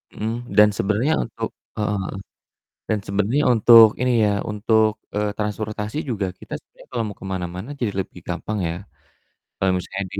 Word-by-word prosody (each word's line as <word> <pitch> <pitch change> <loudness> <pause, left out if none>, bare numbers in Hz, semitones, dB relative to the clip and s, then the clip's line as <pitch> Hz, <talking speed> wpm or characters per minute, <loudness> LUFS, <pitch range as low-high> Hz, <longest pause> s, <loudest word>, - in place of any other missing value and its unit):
Mhm, 110 +1 -2 0.3
dan 105 0 +8
sebenernya 110 +9 +1
untuk - - -5 0.3
heeh 105 -1 0
heeh, 95 - -4 0.8
dan 110 -1 +1
sebenernya 105 +9 +1
untuk 115 0 +9
ini 125 0 +2
ya, 105 - +3 0.2
untuk, 110 +1 +3 0.3
eee, 105 0 +1
transportasi 105 +3 -3
juga 100 -5 -1
kita - - -9
sebenernya - - -20
kalo 120 -2 -1
mau 105 - -10
ke - - -7
mana-mana 90 +6 -5
jadi 115 -5 0
lebih - - -10
gampang 105 -1 -3
ya, 85 - -3 0.8
kalo 95 - +1
misalnya 95 +2 -4
di - - -3
105 Hz, 165 wpm, -22 LUFS, 100-110 Hz, 0.8 s, untuk